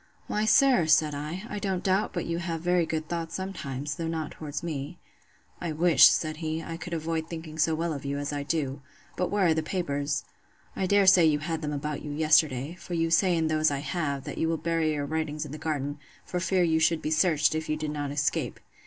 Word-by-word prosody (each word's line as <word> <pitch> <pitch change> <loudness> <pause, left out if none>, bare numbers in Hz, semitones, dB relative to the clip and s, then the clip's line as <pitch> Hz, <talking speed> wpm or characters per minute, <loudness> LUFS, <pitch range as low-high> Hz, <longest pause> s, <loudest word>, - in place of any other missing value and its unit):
Why, 210 +1 -1
sir, 255 - +5
said 155 -1 +4
I, 155 +6 -5
I 210 - -4
don't 190 -2 -2
doubt 195 +2 +1
but 175 - -3
you 170 0 -2
have 170 -2 -3
very 175 -1 +2
good 155 -1 -3
thoughts 165 -1 -4
sometimes, 145 -7 -4
though 165 - -3
not 160 -2 -3
towards 150 0 -6
me. 155 0 -4 0.6
I 170 -2 -3
wish, 165 -2 +7
said 155 -1 -1
he, 160 0 -3
I 165 - -5
could 170 +1 -5
avoid 160 0 -2
thinking 160 -2 -7
so 160 0 +3
well 165 0 -1
of 140 - -6
you 140 0 -2
as 145 +1 -3
I 145 - -2
do. 140 -2 -2 0.3
But 180 - -1
where 200 -2 +2
are 165 - +4
the 160 - 0
papers?—I 150 +2 -4
dare 200 +1 +4
say 185 -3 +7
you 150 -1 +3
had 160 +2 -3
them 150 -1 -3
about 150 0 -3
you 150 - -7
yesterday; 150 -1 +2
for 175 - -5
you 165 0 0
say 175 +1 +4
in 160 - +1
those 155 0 +2
I 140 - -1
have, 140 -2 -2
that - - -6
you 160 - +1
will 165 - 0
bury 165 0 0
your 145 -1 -2
writings 155 0 -2
in 145 - -9
the 155 - -7
garden, 145 -2 -3 0.3
for 180 - -3
fear 185 0 +2
you 160 -2 +2
should 160 0 +2
be 155 - -2
searched, 155 -2 +3
if 155 0 -3
you 155 - 0
did 155 -1 -3
not 145 -1 -3
escape. 145 0 -1
160 Hz, 230 wpm, -27 LUFS, 150-170 Hz, 0.6 s, wish